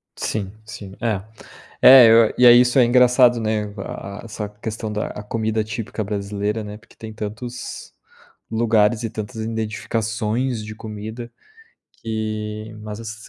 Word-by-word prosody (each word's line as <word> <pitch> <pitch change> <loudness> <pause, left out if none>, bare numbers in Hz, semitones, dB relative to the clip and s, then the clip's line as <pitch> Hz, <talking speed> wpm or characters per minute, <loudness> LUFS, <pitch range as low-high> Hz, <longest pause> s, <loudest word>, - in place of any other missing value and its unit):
Sim 100 -3 -3
sim, 100 -3 -9
é. 110 -5 -1 0.6
É, 130 -2 +10
eu 115 -1 +6
e 125 - +6
aí 120 0 +9
isso 125 +1 +3
é 125 - +7
engraçado, 125 0 +4
né, 110 -1 -1
a 100 0 -7
a - - -15
essa 105 -2 -6
questão 105 +1 -6
da 105 - -2
a 105 - -8
comida 110 0 -2
típica 110 0 -5
brasileira, 105 +1 -3
né, 105 0 -8
porque - - -23
tem 110 -1 -9
tantos 110 +3 -7 0.6
lugares 110 -1 +2
e 115 - -3
tantas 110 +2 -7
identificações 110 +1 -2
de 110 0 -8
comida 110 +2 -8 0.7
que 110 -1 -4
mas 105 0 -7
ass 115 0 -9
110 Hz, 150 wpm, -21 LUFS, 105-115 Hz, 0.7 s, É